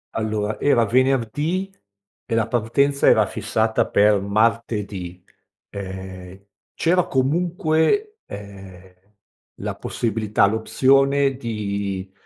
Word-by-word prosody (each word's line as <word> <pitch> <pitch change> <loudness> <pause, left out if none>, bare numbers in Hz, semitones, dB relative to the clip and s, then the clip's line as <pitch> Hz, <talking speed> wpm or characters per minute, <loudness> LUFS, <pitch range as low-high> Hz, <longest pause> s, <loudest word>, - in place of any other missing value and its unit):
Allora, 110 -1 -2
era 130 -5 +3
venerdì 135 - 0 0.5
e 115 - -2
la 115 - +2
partenza 125 +5 +1
era - - +5
fissata 110 0 -1
per 105 0 +3
martedì, 100 -3 -1 0.5
ehm, 95 -1 -8 0.4
c'era 180 +2 +2
comunque, 165 - 0
ehm, 95 -2 -11 0.7
la - - -4
possibilità, 110 -3 0
l'opzione 135 +5 +2
di 100 -5 -4
110 Hz, 90 wpm, -22 LUFS, 100-135 Hz, 0.7 s, era